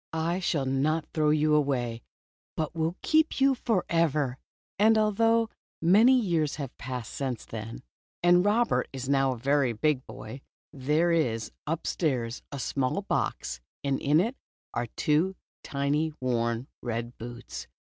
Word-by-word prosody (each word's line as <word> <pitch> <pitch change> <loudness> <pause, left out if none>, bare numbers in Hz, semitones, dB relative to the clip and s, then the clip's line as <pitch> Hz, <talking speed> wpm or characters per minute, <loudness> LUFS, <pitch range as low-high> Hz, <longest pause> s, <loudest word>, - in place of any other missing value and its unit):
I 165 +3 0
shall 155 -6 0
not 145 +4 +1
throw 155 -1 +2
you 155 0 +3
away, 125 -6 +1 0.6
but 155 -2 -2
will 165 +1 -1
keep 315 -1 +3
you 275 0 +5
forever." 165 - 0 0.4
And 220 +2 +5
although 225 +2 +3 0.3
many 220 +10 +6
years 165 -9 0
have 140 -4 -6
passed 125 -2 -5
since 130 -4 -3
then, 115 0 -7 0.4
and 175 0 +6
Robert 225 +4 +2
is 130 -1 -5
now 135 -1 +3
a - - -8
very 135 0 +2
big 130 +3 +1
boy, 130 +5 -9 0.3
there 150 +5 +1
is 115 -10 0 0.2
upstairs 140 -7 -1
a 140 - -5
small 135 +7 -1
box - - -2 0.2
and 140 -1 0
in 145 +3 +4
it 230 +8 0 0.4
are 120 - -1
two 160 +6 +2 0.3
tiny 145 +3 0
worn 120 -1 0 0.2
red 120 +1 -4
boots. 120 +1 -7
150 Hz, 140 wpm, -28 LUFS, 130-175 Hz, 0.6 s, many